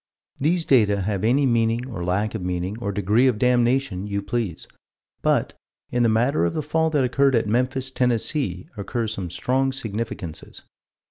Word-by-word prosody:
These 165 +4 +1
data 105 -6 +3
have 100 0 -2
any 130 +6 +3
meaning 115 0 +1
or 95 -9 -5
lack 100 +4 0
of 110 - -4
meaning 90 +2 -2
or 100 -4 -2
degree 105 +6 +2
of 125 -4 +2
damnation 120 -4 +1
you 100 -1 -2
please: 100 -4 -3 0.5
but, - - +1 0.4
in 120 - +1
the 115 - +4
matter 115 -2 +2
of 85 - 0
the 155 - -1
fall 160 +2 +1
that 145 -4 +1
occurred 135 +1 +2
at 115 - +2
Memphis, 130 +4 0
Tennessee, 120 - -1
occur 115 +2 -3
some 100 -5 -4
strong 130 +9 0
significances. 110 -8 -6
115 Hz, 165 wpm, -23 LUFS, 100-130 Hz, 0.5 s, the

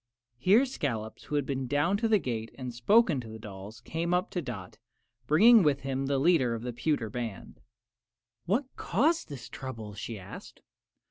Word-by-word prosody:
Here 205 - +5
Scollops, 115 - -4
who 150 - -4
had 145 -2 +1
been 135 -2 -2
down 145 +8 +2
to 225 +2 0
the 220 -1 +5
gate 115 - -3
and 125 -2 -5
spoken 160 - +3
to 115 - -10
the 110 0 -8
dolls, 105 +1 -10
came 170 +7 -1
up 180 - -1
to 180 - -2
Dot, 110 - -8 0.5
bringing 220 +9 +7
with 145 -4 +2
him 135 0 -2
the 140 0 +1
leader 135 -5 +3
of 115 - -6
the 125 -1 -4
pewter 145 -2 0
band. 115 -5 -6 0.9
"What 230 +10 +1
caused 310 - +1
this 135 -5 -8
trouble?" 115 -6 -7
she 110 +2 -6
asked. 95 0 -11
135 Hz, 180 wpm, -29 LUFS, 115-175 Hz, 0.9 s, bringing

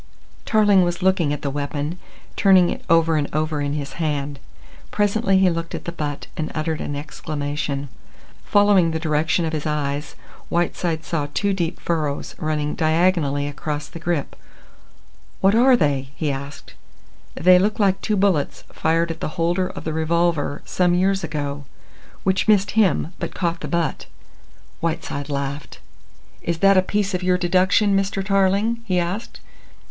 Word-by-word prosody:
Tarling 205 -3 +4
was 175 +1 -2
looking 185 -5 +2
at 145 - -4
the 140 - -1
weapon, 145 +4 -3 0.4
turning 190 -3 +5
it - - -6
over 165 -1 +4
and 145 -1 -1
over 155 -1 0
in 145 0 -1
his 145 -1 -4
hand. 145 -2 -2 0.5
Presently 205 -2 +2
he 190 -1 +4
looked 165 0 -4
at - - -7
the 170 - -3
butt 150 -4 -4
and 155 -1 -3
uttered 155 0 -2
an 145 - -4
exclamation. 145 -1 -4 0.6
Following 205 -4 +4
the 160 0 -2
direction 160 +2 +1
of 160 - -3
his 155 0 -2
eyes, 145 -1 -2 0.3
Whiteside 170 -1 -1
saw 150 -4 -2
two 200 -1 +1
deep 175 -2 -2
furrows 155 -4 -2
running 150 -1 -1
diagonally 160 -3 +1
across 150 +1 -4
the 165 - -10
grip. 170 -3 -2 1.0
"What 195 +1 +4
are 250 +3 +6
they?" 140 - 0
he 150 -3 -1
asked. 140 +1 -7 0.6
"They 180 +1 +6
look 210 +3 +1
like 195 -2 +2
two 215 - 0
bullets 190 -7 +1
fired 165 +1 +1
at 165 - -7
the 155 - -5
holder 175 +2 +1
of - - -8
the 160 - -3
revolver 160 -2 0
some 180 -1 +2
years 190 +1 +1
ago, 145 -2 -4 0.6
which 190 +2 +1
missed 205 -2 +4
him 190 -5 +2
but - - -5
caught 170 -1 -1
the - - -6
butt." 170 -2 -2 0.7
Whiteside 155 -3 -3
laughed. 140 0 -4 0.6
"Is 170 -1 -2
that 195 +3 +5
a 185 - +6
piece 200 +1 -1
of 180 - -1
your 180 0 +2
deduction, 185 +3 +3
Mr. 195 0 -1
Tarling?" 200 +4 +2
he 185 -4 0
asked. 180 +6 -3
165 Hz, 160 wpm, -22 LUFS, 150-190 Hz, 1.0 s, are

